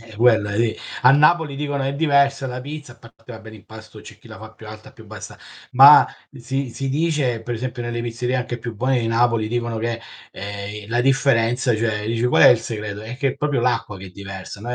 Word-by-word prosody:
Eh, 115 -1 -15
quella 110 -4 +3
lì. 110 0 0 0.3
A 125 - +7
Napoli 150 0 +3
dicono: 145 -1 -3
"È 135 - -2
diversa 140 -2 +2
la 125 0 -5
pizza", 145 -1 -9
a 120 - -22
parte 115 +1 -15
vabbè 110 0 -11
l'impasto, 110 +1 -13
c'è - - -13
chi - - -18
la - - -11
fa - - -12
più - - -14
alta, - - -12
più - - -16
bassa. - - -10 0.4
Ma 140 +3 +8 0.3
si 135 0 -4
si 135 +3 -5
dice, 145 -6 -1
per 120 +1 -4
esempio, 125 +1 -5
nelle 120 0 -4
pizzerie 120 +2 -3
anche 125 -1 -4
più 115 -1 -7
buone 130 +2 0
di 115 - -2
Napoli 115 -1 +1
dicono 120 -1 -3
che, 115 +1 -3 0.3
ehm, 100 +1 -7
la 120 +1 0
differenza, 125 -2 +1
cioè 105 -2 -2
dici: 115 +1 -2
"Qual 125 - +3
è - - +9
il 120 - +5
segreto?" 105 -2 -6
È 115 +3 -8
che 140 0 0
è 135 - -9
proprio 145 -3 -1
l'acqua 120 -4 -1
che 95 - -10
è - - -12
diversa. 95 +1 -9
Noi 120 +3 -4
120 Hz, 225 wpm, -21 LUFS, 110-135 Hz, 0.4 s, è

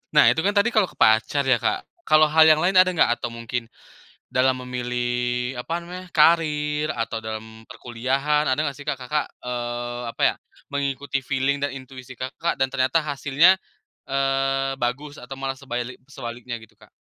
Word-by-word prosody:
Nah, - - +7
itu - - -1
kan 205 +5 +1
tadi 215 +4 +3
kalau 215 -5 +3
ke - - -17
pacar 110 +6 +3
ya, 130 -3 +3
Kak. - - -1 0.2
Kalau 155 0 +5
hal 160 0 +7
yang 155 +1 +5
lain 185 +1 +5
ada 185 - +7
nggak? 155 -9 +2
Atau - - -3
mungkin 115 0 -5 0.6
dalam 130 0 +2
memilih 125 0 -2
apa 165 +7 -3
namanya, 180 +2 -8
karir, 150 -2 +3
atau 115 -1 -3
dalam 110 0 -8
perkuliahan, 135 +5 -1
ada 130 - +3
nggak 140 -3 -3
sih, 145 - -11
Kak, 150 - 0
Kakak, 135 +3 -2 0.2
eee, 120 0 -4
apa 115 - -5
ya, - - +4 0.4
mengikuti 140 -1 -2
feeling 135 +1 -1
dan 140 -1 -2
intuisi 130 -1 -10
Kakak 130 +7 -3
dan 135 0 0
ternyata 130 +6 +1
hasilnya, 150 +5 +3 0.5
eee, 135 0 0
bagus 140 +5 -3
atau 125 +2 -8
malah 135 0 -4
sebaili 125 -2 -5
sebaliknya 120 -2 -7
gitu, 110 -1 -18
Kak? - - -19
135 Hz, 175 wpm, -23 LUFS, 125-150 Hz, 0.6 s, Nah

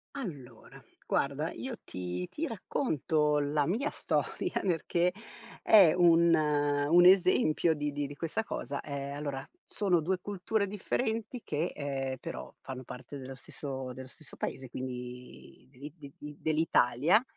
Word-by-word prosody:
Allora, 140 - -8 0.2
guarda, 140 +4 0
io 260 -2 -5
ti 90 0 -4
ti 325 +2 -3
racconto 155 - 0
la 145 0 +1
mia 240 - 0
storia, 360 - -1
perché 175 0 +1 0.5
è 190 -7 +7
un 170 -1 +5
un 145 +2 +4
esempio 180 -3 +5
di 150 0 -2
di 145 0 -2
di 145 - -9
questa 165 +8 -2
cosa. 140 -9 -4
Ehm, 140 -1 -5
allora, 140 -2 -4 0.2
sono 185 -4 +1
2 180 +4 0
culture 205 +2 -1
differenti 220 +4 -2
che, 155 +3 -1
ehm, 135 -4 -3
però - - -7
fanno 130 -1 -7
parte 130 +3 -9
dello 130 0 -8
stesso 130 -1 -6
dello 130 +1 -9
stesso 155 +1 -13
paese, 130 -2 -4
quindi 125 -1 -8
dell'i 140 +2 -10
di 145 -4 -11
di 150 0 -9
dell'Italia, 155 - +3
150 Hz, 140 wpm, -31 LUFS, 135-180 Hz, 0.5 s, è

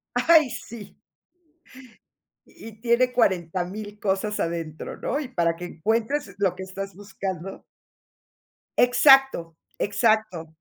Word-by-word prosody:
Ay, 310 +1 +5
sí. 225 -2 -9 1.5
Y 225 -1 -13
tiene 250 +1 +2
40000 195 0 -1
cosas 210 +1 -1
adentro, 165 -2 -4
¿no?, 285 - -2
y 270 -4 -6
para 170 -7 0
que 175 - -10
encuentres 220 - -2
lo 190 -3 +1
que 190 - -7
estás 195 +1 -7
buscando. 195 -2 -6 1.1
Exacto, 245 - +5 0.2
exacto. 205 -5 +1
205 Hz, 100 wpm, -24 LUFS, 180-235 Hz, 1.5 s, Ay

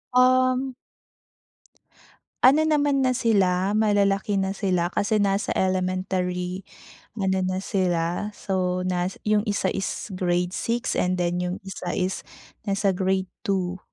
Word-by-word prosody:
Uhm. 255 +1 +3 1.7
Ano 295 +5 +6
naman 285 -3 +2
na 255 - +3
sila, 200 -5 +2
malalaki 200 -1 +2
na 190 +1 -2
sila. 180 -4 0
Kasi 205 +2 +1
nasa 200 0 +1
elementary 185 0 -1 0.5
ano 190 -2 0
na 185 +1 -1
sila, 180 0 0
so 185 -2 -1
nas 180 0 -1
yung 210 +1 +2
isa 200 -2 0
is 195 +2 -4
grade 180 -1 0
6 235 +4 -1
and 180 0 +1
then 175 0 0
yung 180 +1 -2
isa 190 -2 -5
is 185 0 -1 0.5
nasa 200 0 +1
grade 190 0 0 0.2
2. 185 -2 -1
190 Hz, 125 wpm, -24 LUFS, 180-210 Hz, 1.7 s, Ano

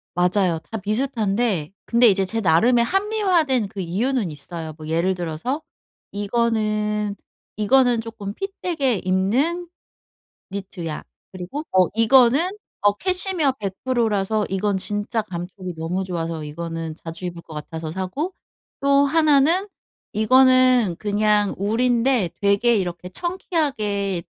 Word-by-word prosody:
맞아요. 180 -1 +2
다 225 - -2
비슷한데 215 - -1
근데 235 +1 +5
이제 195 -2 +3
제 225 +4 -3
나름의 230 +8 +4
합리화된 365 - +1
그 195 - -9
이유는 200 +3 -1
있어요. 160 +2 -7
뭐 155 -1 -9
예를 170 +4 +1
들어서 175 - -3 0.5
'이거는, 210 -1 0 0.4
이거는 240 +2 +3
쪼끔 220 -3 -7
핏 390 - -5
되게 285 -9 +1
입는 225 - 0 0.8
니트야.' 185 -5 -6 0.3
그리고 185 +11 -6
어 185 -1 +4
이거는 250 - +4 0.3
어 205 0 +4
캐시미어 365 - +2
100% 225 +4 -1
라서 210 +1 0
이건 195 +1 0
진짜 205 +4 -2
감촉이 180 0 -7
너무 170 +4 -2
좋아서 165 -3 -4
이거는 165 +1 -5
자주 165 +2 -7
입을 175 -1 -6
것 165 - -13
같아서 160 +1 -6
사고 190 - -3 0.5
또 280 0 +4
하나는 310 +4 +3 0.5
이거는 255 -2 +5
그냥 210 -1 +2
울인데 235 0 +1
'되게 200 +4 +3
이렇게 180 -3 -3
청키하게 215 - -2
210 Hz, 270 characters per minute, -22 LUFS, 185-255 Hz, 0.8 s, 근데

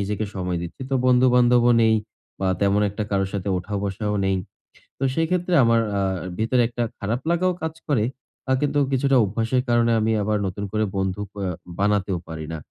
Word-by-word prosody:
নিজেকে 105 +2 -2
সময় 90 -2 -2
দিচ্ছি। 85 +10 -7
তো - - +1
বন্ধু-বান্ধবও 125 -1 +5
নেই 110 0 +4 0.5
বা 95 - +1
তেমন 100 +1 +3
একটা 105 +1 -4
কারো 95 -1 +1
সাথে 100 -1 -3
ওঠা-বসাও 100 +2 -3
নেই। 95 0 +1 0.6
তো 135 - -4
সেই 165 0 +1
ক্ষেত্রে 180 0 0
আমার 115 0 +4 0.2
আ - - +1 0.4
ভিতরে 120 +3 +2
একটা 120 0 -3 0.2
খারাপ 115 +5 -2
লাগাও 180 +1 +2
কাজ 160 0 -2
করে। 130 -8 +2 0.5
আ - - +2
কিন্তু 145 0 +1
কিছুটা 135 0 +2
অভ্যাসের 115 +5 0
কারণে 120 0 +3
আমি 110 +1 +1
আবার 105 0 +1
নতুন 95 +2 -4
করে 110 0 0
বন্ধু 95 +1 -1 0.2
আ - - -1 0.3
বানাতেও 100 -2 +1
পারি 80 -1 -6
না। 80 - -3
110 Hz, 180 wpm, -23 LUFS, 100-125 Hz, 0.6 s, বন্ধু-বান্ধবও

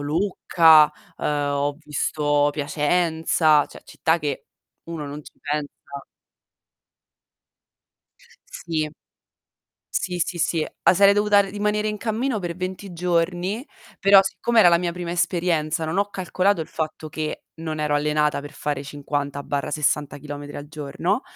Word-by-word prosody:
Lucca, 160 -1 +4 0.3
uhm, - - -7
ho 145 -1 0
visto 145 -1 +1
Piacenza, 155 0 +2
cioè - - -14
città 165 +1 0
che 145 -3 -4 0.4
uno 165 -3 -6
non 145 +2 -7
ci - - -14
pensa 145 0 -3 2.8
Sì. 155 -2 -3 1.1
Sì, 180 -1 -1
sì, 175 - -1
sì. 165 -1 +1 0.2
Ah, - - +5
sarei 200 +2 +6
dovuta 205 0 +4
rimanere 210 +2 -1
in 210 - -2
cammino 225 +2 -1
per 175 -3 -4
20 185 +1 -5
giorni, 180 - -1 0.3
però 195 0 +7
siccome 230 +4 0
era 195 -5 +8
la 170 - +5
mia 170 -1 -2
prima 175 -1 -5
esperienza 170 -2 0
non 160 +3 -2
ho 200 - +2
calcolato 185 0 0
il 160 - -4
fatto 155 0 -4
che 155 0 -4
non 160 -1 -5
ero 150 -1 +1
allenata 150 0 +1
per 145 +1 -10
fare 145 -1 -3
50/60 145 0 -2
chilometri 145 0 -8
al 145 0 -8
giorno, 155 - -2
160 Hz, 130 wpm, -23 LUFS, 150-180 Hz, 2.8 s, era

